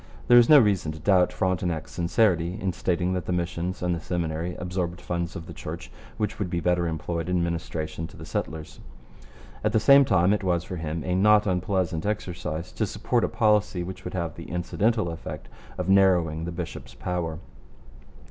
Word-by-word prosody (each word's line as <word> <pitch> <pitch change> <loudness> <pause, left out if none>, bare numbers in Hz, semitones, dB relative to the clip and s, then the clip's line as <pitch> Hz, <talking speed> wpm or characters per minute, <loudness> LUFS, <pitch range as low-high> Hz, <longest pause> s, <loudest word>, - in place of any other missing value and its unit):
There 120 0 +9
is 120 - +4
no 150 - +10
reason 100 - +3
to 80 - -10
doubt 90 +2 +3
Frontenac's 90 -4 -1
sincerity 90 0 +1
in 95 -4 -1
stating 90 +1 0
that 90 -2 -3
the - - -1
missions 90 +1 -2
and 90 0 +1
the 85 - -2
Seminary 85 0 -3
absorbed 90 -1 -3
funds 85 -1 -3
of 80 - -6
the 85 - -9
Church - - -7 0.3
which 105 0 -2
would 100 -4 -2
be 85 - -1
better 90 0 +1
employed 85 +1 -3
in 90 -1 +1
ministration 80 -1 -3
to - - -15
the - - -9
settlers. 80 -1 -5 0.8
At 105 0 +1
the 110 - +4
same 140 +5 +7
time, 95 -5 +3
it 105 - -1
was 85 -2 +1
for 90 0 -6
him 80 0 -3
a 90 - 0
not 105 +3 +5
unpleasant 90 -2 0
exercise 90 -5 -3
to 110 - -1
support 115 +4 0
a - - +1
policy 105 -5 +2
which 90 +1 -7
would 90 - -6
have 85 -3 -2
the 85 - -10
incidental 105 +4 0
effect 75 -5 -8 0.3
of 90 - -3
narrowing 90 -5 +3
the 85 - -4
bishop's 85 -1 -7
power. 85 -3 -3
90 Hz, 190 wpm, -26 LUFS, 85-95 Hz, 0.8 s, no